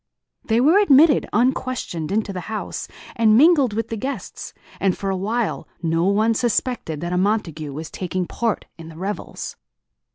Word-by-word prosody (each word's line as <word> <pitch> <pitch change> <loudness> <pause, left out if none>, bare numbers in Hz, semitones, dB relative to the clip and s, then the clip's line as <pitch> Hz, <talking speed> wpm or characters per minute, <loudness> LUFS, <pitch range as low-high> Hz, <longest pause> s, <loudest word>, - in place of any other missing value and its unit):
They 225 0 +1
were 315 +10 +5
admitted, 300 -6 +5
unquestioned, 240 - -1
into 210 -1 -1
the 185 - -4
house, 220 -1 -4 0.3
and 220 -1 +4
mingled 285 -5 +5
with 225 +1 -2
the 225 - -3
guests; 270 +6 -5 0.3
and 195 -2 +1
for 195 -1 -2
awhile 210 +5 -2 0.2
no 165 +1 +1
one 215 +4 +3
suspected 225 - -1
that 175 +1 -3
a 180 - +1
Montague 170 -7 -1
was 155 +3 -7
taking 185 0 -3
part 230 +3 -2
in 165 0 -9
the 160 - -12
revels. 195 +4 -5
210 Hz, 160 wpm, -22 LUFS, 180-240 Hz, 0.3 s, were